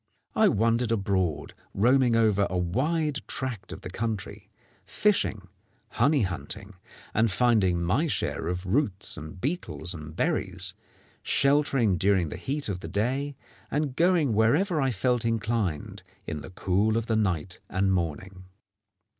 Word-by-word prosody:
I - - +5
wandered 115 +2 +2
abroad, 95 -9 0 0.2
roaming 125 +3 +4
over 105 -3 +3
a 90 - -1
wide 140 - 0
tract 125 -7 -4
of - - -7
country, 105 +1 -4 0.3
fishing, 100 - 0 0.4
honey 140 +1 +2
hunting, 95 +4 -4 0.4
and 110 +1 +3
finding 95 -5 +2
my 110 - +1
share 110 - -2
of 90 +2 -3
roots 105 -1 +1
and 80 +3 -9
beetles 140 - -2
and 75 -1 -9
berries, - - -1 0.5
sheltering 140 - +2
during 95 -4 +2
the - - -6
heat 145 +2 -3
of 95 -3 -3
the 80 - -7
day, 130 - -1 0.3
and 145 -2 -1
going 170 -7 +3
wherever 150 - +2
I 135 - +2
felt 125 +2 0
inclined 115 -7 -1 0.2
in 75 - -4
the - - -9
cool 100 +4 +1
of 115 - -1
the 115 - 0
night 90 -5 -1
and 95 +1 +1
morning. 90 +2 -3
110 Hz, 140 wpm, -27 LUFS, 95-130 Hz, 0.5 s, I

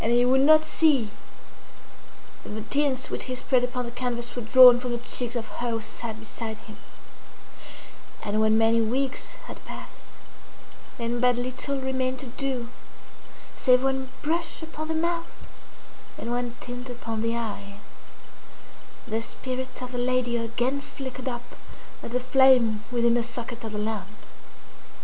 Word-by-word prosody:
And 225 - +2
he 240 +1 +5
would 260 +1 +4
not 310 +2 +7
see 285 -11 +3 1.3
that - - -10
the 215 0 -5
tints 275 0 0
which - - -3
he 255 - -3
spread 255 0 +2
upon 250 0 -2
the 235 - -6
canvas 240 -1 -3
were 245 - -3
drawn 245 +1 +9
from 250 -1 -3
the - - 0
cheeks 245 0 -1
of 225 -2 -2
her 240 - 0
who 225 -1 0
sate 220 +1 -5
beside 220 0 -6
him. 215 0 -13 1.5
And 215 +1 0
when 220 0 +4
many 225 +1 +4
weeks 260 +4 -1
had - - -10
passed, - - -11 0.9
and 235 0 -2
but 250 -1 +4
little 255 +3 -1
remained 260 -1 -1
to - - -7
do, 255 -1 -3 0.9
save 250 -1 +4
one 265 -1 0
brush 330 +2 -1
upon 315 -1 -6
the 320 - -1
mouth 335 +1 -1 0.8
and 235 - -4
one 245 0 -2
tint 245 +1 -6
upon 230 -2 -4
the 230 +1 0
eye, 205 -3 -5 1.3
the 225 +1 -1
spirit 255 +2 -5
of 250 - -6
the 245 - -3
lady 245 -1 +1
again 240 +4 -1
flickered 260 -2 -6
up 240 -1 -7 0.5
as 235 - -7
the 250 - +2
flame 255 -4 +5
within 235 -1 +3
the 240 - +3
socket 235 0 -6
of 220 - -5
the 210 - -4
lamp. 210 -2 -3
245 Hz, 160 wpm, -26 LUFS, 230-260 Hz, 1.5 s, drawn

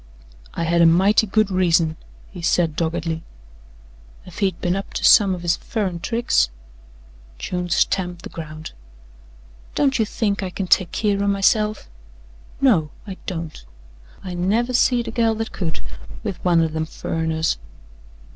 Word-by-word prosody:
"I 170 - -1
had 170 +1 +2
a 170 - +7
mighty 195 +6 +4
good 215 0 +2
reason," 170 -3 +2 0.4
he 180 - -9
said 165 -2 +1
doggedly. 165 0 -2 1.0
"Ef 180 - -11
he'd 190 -4 0
been 175 +1 0
up 195 0 -5
to - - -2
some 200 -4 +6
of 175 - -9
his 170 -1 +2
furrin' 195 -6 -3
tricks 230 - +1 0.4
" - - -25
June 180 - -3
stamped 180 0 0
the - - -7
ground. 155 -1 -8 1.0
"Don't 270 -3 +2
you 220 - +3
think 205 -3 -1
I 190 - -3
kin 190 +1 -4
take 180 -1 +3
keer 200 -2 0
o' - - 0
myself?" 210 +2 +2 0.7
"No, 195 - +3 0.2
I 195 -3 -7
don't. 165 -3 -5 0.6
I 185 -2 -5
never 215 +8 0
seed 240 -1 +3
a - - -3
gal 225 -2 +2
that 225 +1 -4
could 165 -5 -4 0.4
with 185 - -5
one 175 -2 +4
o' - - +2
them 160 0 -3
furriners." 160 - -1
180 Hz, 155 wpm, -22 LUFS, 165-205 Hz, 1.0 s, a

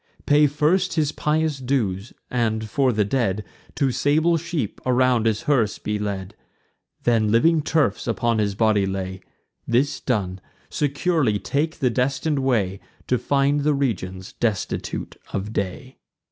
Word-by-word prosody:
Pay 145 +1 +5
first 160 +6 +1
his 155 -3 +1
pious 155 -1 0
dues; 120 -6 -1 0.2
and, 110 -3 0
for 130 +4 +2
the 105 -2 +1
dead, 105 -3 0 0.3
Two 140 -3 +1
sable 155 +6 +2
sheep 165 - -3
around 125 -2 +3
his 110 +4 0
hearse 130 -9 +1
be 105 0 -3
led; 100 -1 -4 0.7
Then, 115 -3 +2
living 160 +8 +4
turfs 145 -10 0
upon 115 -1 +1
his 100 -2 0
body 105 -2 +2
lay: 95 -1 -4 0.5
This 130 +5 +1
done, 95 -7 -2 0.3
securely 145 - +1
take 145 - -1
the 130 -5 +1
destin'd 135 +4 0
way, 105 -8 0 0.3
To 125 - +2
find 140 +1 +2
the 150 0 +2
regions 95 -9 -3
destitute 110 -5 -3 0.2
of 100 +2 -3
day." 100 +7 -4
125 Hz, 140 wpm, -23 LUFS, 105-145 Hz, 0.7 s, Pay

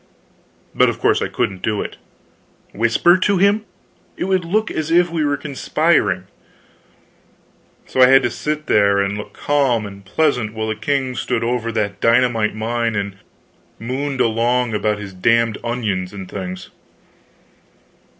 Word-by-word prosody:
But - - +4
of - - -4
course - - +2
I - - 0
couldn't 95 -2 -2
do 105 -2 -1
it. - - -8 0.8
Whisper 115 - +3
to 200 +1 +2
him? 200 +3 +2 0.5
It - - -2
would 190 -1 +1
look 215 +5 0
as 155 0 -3
if 175 +1 +3
we 165 -2 0
were 145 -1 0
conspiring. 140 -1 0 1.6
So 130 - 0
I 125 - +9
had 135 +1 +6
to 120 - 0
sit 150 +4 -3
there 100 -1 +3
and 100 +1 0
look 105 - -8
calm 135 -7 +1
and 100 -1 -10
pleasant 120 -1 0
while 110 0 -3
the 110 - -1
king 130 +3 -1
stood 120 -1 -2
over 115 -1 -1
that 100 -2 -2
dynamite 115 -2 +2
mine 115 +1 -1
and 100 -1 -3 0.6
mooned 130 +3 -3
along 120 +1 +1
about 105 0 0
his 100 -2 -8
damned 115 +3 +1
onions 105 -7 -2
and 95 -2 -8
things. 95 -2 -7
115 Hz, 150 wpm, -19 LUFS, 105-145 Hz, 1.6 s, I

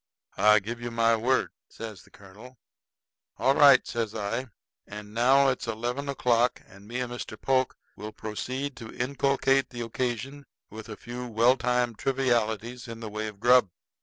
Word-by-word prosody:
"I 105 0 +6
give 115 +4 -4
you 120 - -4
my 115 0 +3
word," 125 +4 +1 0.2
says 110 -4 -8
the - - -20
colonel. 105 +6 -15 0.8
"All 135 +3 +3
right," 140 -2 +7
says 115 -2 -3
I; 115 +5 -3 0.4
"and 105 0 -9
now 135 +4 +4
it's 125 -2 -3
eleven 120 +5 -3
o'clock, 125 -2 +1
and 100 +1 -16
me 120 +3 -3
and 125 -1 -4
Mr. 115 -2 -7
Polk 130 -1 +1 0.2
will 105 +2 -7
proceed 130 +7 -5
to 115 -1 -9
inculcate 135 +1 +1
the 120 -1 -7
occasion 130 +4 -4 0.2
with 110 +1 -9
a 105 - -7
few 125 +1 -7
well 120 +2 +4
timed 125 -2 0
trivialities 120 -2 -1
in 115 -1 -8
the 110 -2 -7
way 110 +1 -3
of 105 -2 -9
grub." 120 -2 +5
120 Hz, 165 wpm, -27 LUFS, 110-130 Hz, 0.8 s, right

